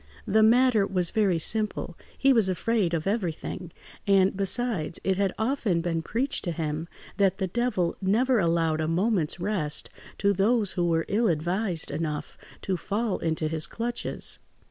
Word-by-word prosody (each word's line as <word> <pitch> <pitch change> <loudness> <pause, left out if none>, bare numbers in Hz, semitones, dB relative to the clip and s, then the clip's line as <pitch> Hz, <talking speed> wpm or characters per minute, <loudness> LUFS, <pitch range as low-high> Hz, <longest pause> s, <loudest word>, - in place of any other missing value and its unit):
The 220 +2 +3
matter 225 -2 +4
was 180 -3 -1
very 200 -5 +2
simple: 210 0 -2 0.2
he 270 0 +4
was 220 -6 +3
afraid 185 -1 0
of 160 - -3
everything; 180 -3 -3 0.4
and, 195 -1 +4
besides, 195 -4 0
it 190 -1 +1
had 195 -2 +2
often 220 -7 0
been 165 -1 -1
preached 240 - -2
to 175 - -1
him 160 0 -3 0.3
that 195 -2 +2
the 190 - -1
Devil 190 -4 -1
never 230 +6 +2
allowed 165 -3 +1
a 155 - -1
moment's 175 -1 0
rest 175 -6 -1 0.3
to 200 0 +2
those 205 +1 +2
who 175 -1 0
were 165 -1 +1
ill 225 +3 +1
advised 175 +1 -1
enough 150 0 -4 0.3
to 190 -2 -1
fall 205 +4 -2
into 160 -1 -1
his 155 0 0
clutches. 235 +1 0
190 Hz, 160 wpm, -26 LUFS, 165-220 Hz, 0.4 s, matter